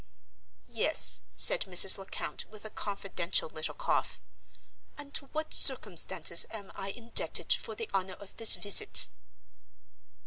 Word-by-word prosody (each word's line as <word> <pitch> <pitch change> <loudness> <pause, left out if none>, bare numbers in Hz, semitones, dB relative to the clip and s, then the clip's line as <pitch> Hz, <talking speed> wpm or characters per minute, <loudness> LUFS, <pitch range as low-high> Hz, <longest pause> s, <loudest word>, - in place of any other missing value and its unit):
"Yes," - - +1
said - - +4
Mrs. 185 +2 +5
Lecount, 195 - -9
with 215 0 -16
a 215 - -10
confidential 195 -5 -6
little 155 0 -8
cough. - - -5 0.8
"And 285 -1 -13
to 275 - -9
what 310 +2 -8
circumstances 185 - +1
am 205 -3 -13
I 195 - -9
indebted 235 +3 -2
for - - -7
the 455 - -9
honor 190 -1 -5
of 200 - -16
this 225 - +8
visit?" 210 - +5
205 Hz, 130 wpm, -27 LUFS, 190-240 Hz, 0.8 s, this